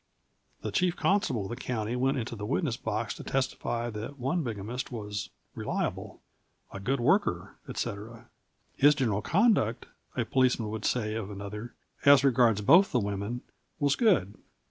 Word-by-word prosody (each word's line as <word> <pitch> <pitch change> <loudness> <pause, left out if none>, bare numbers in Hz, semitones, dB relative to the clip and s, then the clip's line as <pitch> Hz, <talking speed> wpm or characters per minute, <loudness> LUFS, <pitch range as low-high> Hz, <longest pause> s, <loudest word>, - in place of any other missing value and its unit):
The - - -3
chief 180 -1 +1
constable 190 - +1
of 95 - -6
the 120 - -4
county 120 -2 -3
went 135 +2 +1
into 120 -1 -3
the 105 - -7
witness 140 -2 0
box 110 0 -3
to - - -9
testify 120 -3 -2
that 110 +6 -6
one 140 +7 0
bigamist 120 +1 -4
was 105 -3 -5 0.2
"reliable," - - -3 0.5
"a, 95 - -7
good 130 +8 -1
worker," 120 - +1
etc. 110 +3 -5 0.5
"His 145 +2 +5
general 110 -8 0
conduct," 180 - +2 0.3
a - - +1
policeman 125 -4 +1
would 110 -1 -4
say 110 -4 0
of 110 -3 -4
another, 105 +3 -7 0.3
"as 140 -1 +7
regards 120 -5 +4
both 175 - +6
the 125 - +2
women, 100 +3 -3 0.4
was 140 -1 +2
good." 155 - +3
120 Hz, 155 wpm, -29 LUFS, 105-135 Hz, 0.5 s, as